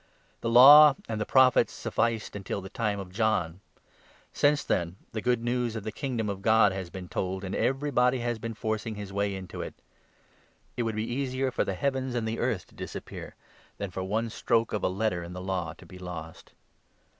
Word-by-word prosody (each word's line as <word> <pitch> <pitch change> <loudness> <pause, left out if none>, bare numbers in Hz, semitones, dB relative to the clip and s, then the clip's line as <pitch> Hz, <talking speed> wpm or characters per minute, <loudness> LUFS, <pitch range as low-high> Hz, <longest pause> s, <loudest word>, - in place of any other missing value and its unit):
The 115 - -2
Law 140 +5 +9
and 110 -1 -3
the 105 - -2
Prophets 130 -1 +5
sufficed 115 -3 -1
until 100 0 -4
16 100 - -6
the 95 - -8
time 105 -3 -1
of 95 -2 -8
John. 95 -5 0 0.7
Since 145 0 +3
then 85 -1 -1 0.2
the 110 - -4
Good 125 0 +1
News 120 -1 -1
of 110 - -4
the 110 - -4
Kingdom 120 -2 -3
of 100 -1 -4
God 110 -1 +5
has 95 -2 -5
been 90 0 -8
told, 95 +2 -3
and 95 - -4
everybody 130 -2 +1
has 120 -2 -2
been 115 0 -5
forcing 110 +1 -3
his 100 -2 -7
way 100 0 0
into 95 -1 -7
it. - - -6 1.0
It 125 - -2
would 115 -2 -1
be 110 +1 -1
easier 130 +1 -1
for - - 0
the 95 - -3
heavens 130 +2 -1
and 115 -2 -1
the 110 +1 -2
17 - - -7
earth 115 -7 -1
to - - -22
disappear - - -8 0.4
than 100 -2 -4
for 95 - -4
one 110 +4 -1
stroke 115 +1 +1
of 105 - -2
a - - +2
letter 95 -2 -1
in 85 +1 -8
the 90 - -6
Law 95 -1 -3
to - - -16
be 90 - -12
lost. 85 -3 -8
110 Hz, 210 wpm, -28 LUFS, 95-120 Hz, 1.0 s, Law